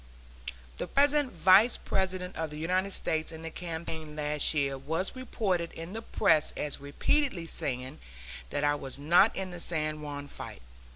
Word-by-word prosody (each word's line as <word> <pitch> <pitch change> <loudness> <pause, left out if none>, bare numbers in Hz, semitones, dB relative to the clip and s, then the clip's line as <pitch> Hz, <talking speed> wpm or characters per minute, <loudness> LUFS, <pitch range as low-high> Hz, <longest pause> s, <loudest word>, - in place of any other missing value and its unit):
The - - -2
present 285 -1 +3
Vice 190 +7 +6
President 185 -1 -2
of 160 -1 -2
the 150 - -8
United 185 +5 0
States 160 -3 -1
in 160 0 -9
the 165 - -5
campaign 160 -3 -6
last 150 -1 +3
year 140 -2 +2
was 160 - -3
reported 195 -9 -1
in 165 +3 -7
the 225 - -4
press 160 -8 +3
as 145 -2 -3
repeatedly 175 - 0
saying 130 -3 -2 0.5
that 145 - -2
I 145 0 +4
was 135 -2 -5
not 175 +9 +5
in 190 -1 -4
the 175 - -7
San 155 -2 -2
Juan 145 -1 -6
fight. - - -9
165 Hz, 165 wpm, -30 LUFS, 150-185 Hz, 0.5 s, Vice